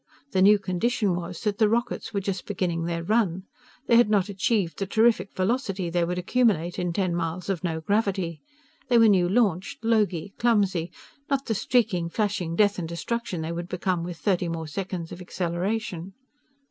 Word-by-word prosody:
The 190 - +2
new 205 +2 +7
condition 200 +1 0
was 175 0 -5
that 210 0 -1
the 215 -2 +5
rockets 235 0 -1
were 200 - -1
just 190 -1 -4
beginning 175 -4 -1
their 170 0 -2
run. 190 -2 +1 0.4
They 235 - +5
had 240 -2 +5
not 205 -2 +2
achieved 195 -2 0
the 195 - -2
terrific 220 -2 +2
velocity 195 -3 -1
they 175 0 +1
would 180 +1 -2
accumulate 180 -4 +1
in 180 -1 -1
ten 185 0 0
miles 170 +2 -3
of 190 -2 -2
no 160 -2 -2
gravity. 190 -3 -1 0.5
They 240 - +5
were 230 -1 +7
new 185 -4 +4
launched; 200 -1 0
logy: 205 -5 +1
clumsy: 195 -7 +2 0.4
not 275 -1 0
the 225 - 0
streaking, 195 -6 +1
flashing 195 -4 -1
death 205 0 +3
and 165 -2 -4
destruction 185 +1 -3
they 160 +1 -3
would 170 +1 -5
become 180 -1 -1
with 175 -1 -6
thirty 180 -2 0
more 165 -1 -4
seconds 180 0 -5
of 180 - -8
acceleration. 180 +1 -3
190 Hz, 180 wpm, -26 LUFS, 175-215 Hz, 0.5 s, new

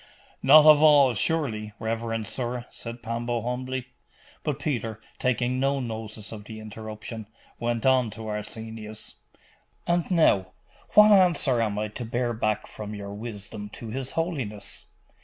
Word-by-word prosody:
'Not 150 +3 +8
of 155 -1 +8
all, 145 -4 +7
surely, 110 -5 -1
reverend 115 0 -2
sir?' 120 +1 -3
said 115 0 -8
Pambo 115 0 -2
humbly. 130 +1 -3 0.6
But 145 -3 -2
Peter, 115 -7 -2 0.2
taking 125 0 +1
no 135 +1 +1
notice 110 -3 -5
of 105 -2 -8
the 110 0 -8
interruption, 110 0 -7 0.3
went 120 0 -1
on 130 -3 +4
to 110 - -7
Arsenius 110 +1 -6 0.7
'And 175 0 +1
now, 100 - +3 0.4
what 210 0 +9
answer 175 - +4
am 105 -2 0
I 105 0 -1
to 115 +4 -6
bear 120 +1 -1
back 110 -1 -1
from 105 0 -7
your 100 -1 -6
wisdom 105 -1 -7
to 115 - -7
his 130 +3 -4
holiness? 135 - -3
115 Hz, 140 wpm, -26 LUFS, 110-130 Hz, 0.7 s, what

